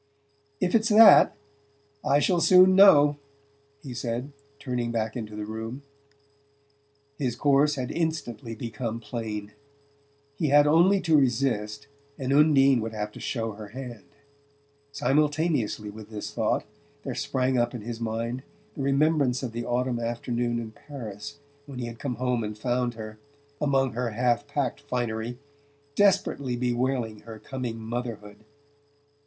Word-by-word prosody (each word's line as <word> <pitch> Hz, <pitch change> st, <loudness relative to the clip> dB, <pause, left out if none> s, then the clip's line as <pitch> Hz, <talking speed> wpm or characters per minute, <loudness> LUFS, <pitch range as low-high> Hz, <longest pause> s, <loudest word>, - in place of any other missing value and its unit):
"If 180 Hz, -, 0 dB
it's 225 Hz, 0 st, +3 dB
that, 215 Hz, 0 st, +8 dB, 0.7 s
I 140 Hz, -, +3 dB
shall 175 Hz, +3 st, +2 dB
soon 185 Hz, +1 st, +7 dB
know," 150 Hz, -7 st, +7 dB, 0.7 s
he 135 Hz, -4 st, -7 dB
said, 120 Hz, +3 st, -4 dB, 0.3 s
turning 125 Hz, -4 st, -3 dB
back 110 Hz, -1 st, -2 dB
into 110 Hz, -3 st, -6 dB
the 105 Hz, 0 st, -5 dB
room. 110 Hz, +5 st, -6 dB, 1.4 s
His 125 Hz, -5 st, -1 dB
course 145 Hz, +3 st, +3 dB
had 130 Hz, -2 st, -4 dB
instantly 120 Hz, -9 st, -3 dB
become 115 Hz, 0 st, -4 dB
plain. 110 Hz, -3 st, -5 dB, 0.8 s
He 155 Hz, -, -1 dB
had 145 Hz, +1 st, +6 dB
only 175 Hz, +6 st, +4 dB
to 165 Hz, -3 st, +2 dB
resist 120 Hz, -5 st, 0 dB, 0.3 s
and 135 Hz, 0 st, -1 dB
Undine 140 Hz, -4 st, +5 dB
would 110 Hz, 0 st, -4 dB
have 105 Hz, -1 st, -4 dB
to -, -, -11 dB
show 115 Hz, -3 st, -3 dB
her 105 Hz, 0 st, -9 dB
hand. 125 Hz, +2 st, -9 dB, 0.9 s
Simultaneously 145 Hz, -5 st, 0 dB
with 105 Hz, 0 st, -11 dB
this 105 Hz, -2 st, -6 dB
thought -, -, 0 dB, 0.4 s
there -, -, -4 dB
sprang 130 Hz, -1 st, 0 dB
up 120 Hz, +1 st, 0 dB
in 120 Hz, -, -6 dB
his 115 Hz, 0 st, -6 dB
mind 115 Hz, +2 st, -3 dB, 0.3 s
the -, -, -6 dB
remembrance 140 Hz, -2 st, +2 dB
of 125 Hz, -, -3 dB
the 120 Hz, +1 st, -5 dB
autumn 125 Hz, 0 st, -1 dB
afternoon 120 Hz, 0 st, -2 dB
in 115 Hz, -2 st, -5 dB
Paris 120 Hz, 0 st, -9 dB, 0.3 s
when 140 Hz, -3 st, -8 dB
he 125 Hz, -, -3 dB
had 115 Hz, -1 st, -8 dB
come 130 Hz, -4 st, -3 dB
home 125 Hz, -2 st, -1 dB
and 105 Hz, 0 st, -5 dB
found 120 Hz, +1 st, -1 dB
her, 110 Hz, -1 st, -9 dB, 0.4 s
among 135 Hz, -4 st, +1 dB
her 120 Hz, +1 st, -2 dB
half 120 Hz, +4 st, 0 dB
packed 140 Hz, -2 st, -2 dB
finery, 120 Hz, -3 st, -3 dB, 0.6 s
desperately 185 Hz, -9 st, +2 dB
bewailing 120 Hz, -2 st, -1 dB
her 115 Hz, -1 st, -10 dB
coming 125 Hz, -1 st, -5 dB
motherhood. 110 Hz, -2 st, -6 dB
125 Hz, 140 wpm, -26 LUFS, 115-140 Hz, 1.4 s, that